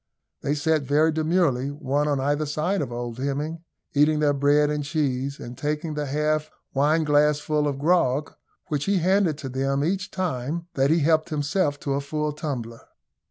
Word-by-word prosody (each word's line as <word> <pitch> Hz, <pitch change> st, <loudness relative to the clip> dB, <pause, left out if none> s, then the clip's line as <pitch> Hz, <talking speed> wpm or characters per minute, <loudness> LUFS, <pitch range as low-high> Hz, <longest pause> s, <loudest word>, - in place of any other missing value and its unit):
They 145 Hz, -, 0 dB
sat 155 Hz, +1 st, +1 dB
very 150 Hz, +4 st, +3 dB
demurely, 155 Hz, -4 st, +1 dB
one 145 Hz, 0 st, -1 dB
on 145 Hz, -2 st, +1 dB
either 145 Hz, +3 st, 0 dB
side 155 Hz, +6 st, 0 dB
of 135 Hz, -, -4 dB
old 120 Hz, 0 st, -5 dB
Hemming, 145 Hz, +4 st, -2 dB, 0.3 s
eating 150 Hz, +1 st, +4 dB
their 150 Hz, -1 st, +3 dB
bread 145 Hz, +1 st, +3 dB
and 150 Hz, -1 st, -1 dB
cheese, 140 Hz, -3 st, -1 dB
and 120 Hz, +1 st, -8 dB
taking 150 Hz, +3 st, -2 dB
the 150 Hz, -1 st, -3 dB
half 150 Hz, +2 st, 0 dB, 0.2 s
wineglassful 150 Hz, 0 st, +2 dB
of 140 Hz, -2 st, -2 dB
grog, 150 Hz, -2 st, +1 dB, 0.3 s
which 150 Hz, -5 st, -2 dB
he 200 Hz, 0 st, +2 dB
handed 180 Hz, -3 st, +2 dB
to 140 Hz, -3 st, -6 dB
them 135 Hz, +2 st, 0 dB
each 185 Hz, +4 st, -1 dB
time 165 Hz, -3 st, -3 dB
that 135 Hz, 0 st, +2 dB
he 165 Hz, +1 st, +3 dB
helped 155 Hz, +2 st, +2 dB
himself 145 Hz, 0 st, 0 dB
to 140 Hz, -, -1 dB
a 140 Hz, -, 0 dB
full 150 Hz, +1 st, -2 dB
tumbler. 125 Hz, -7 st, -5 dB
150 Hz, 170 wpm, -25 LUFS, 140-155 Hz, 0.3 s, eating